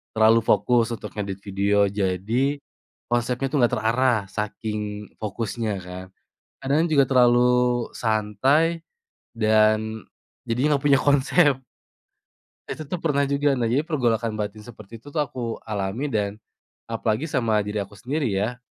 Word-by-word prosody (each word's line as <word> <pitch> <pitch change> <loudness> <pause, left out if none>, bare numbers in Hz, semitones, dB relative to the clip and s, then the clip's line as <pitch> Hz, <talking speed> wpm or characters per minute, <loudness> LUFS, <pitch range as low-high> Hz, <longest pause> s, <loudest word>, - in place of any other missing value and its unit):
Terlalu 110 +1 +5
fokus 115 +3 +2
untuk 115 - -7
ngedit 100 -2 -4
video 100 +1 +1
jadi 105 +8 -1 0.5
konsepnya 120 +2 0
tuh 135 - -1
nggak 120 - +3
terarah 120 +3 +2
saking 105 0 -4
fokusnya 110 +1 -3
kan. 90 0 -8 0.6
Kadang 145 +5 +2
juga 150 -4 +4
terlalu 125 -1 +3
santai 130 +10 +1 0.4
dan 110 -1 +2 0.4
jadinya 130 +6 +1
nggak 140 0 -2
punya 140 - +6
konsep. 145 0 +3 1.1
Itu 155 - -5
tuh 170 +5 -4
pernah 140 -3 +1
juga, 140 0 +1
nah 120 - 0
jadi 120 +5 +2
pergolakan 120 -8 -1
batin 105 0 -4
seperti 110 0 -12
itu 145 - -12
tuh 150 +1 -1
aku 120 -3 -5
alami 105 +4 -3
dan 105 -2 0 0.5
apalagi 115 +3 -1
sama 120 -8 0
diri 105 0 -2
aku 100 +1 -9
sendiri 140 +3 -2
ya. 105 +5 -2
115 Hz, 135 wpm, -24 LUFS, 105-135 Hz, 1.1 s, punya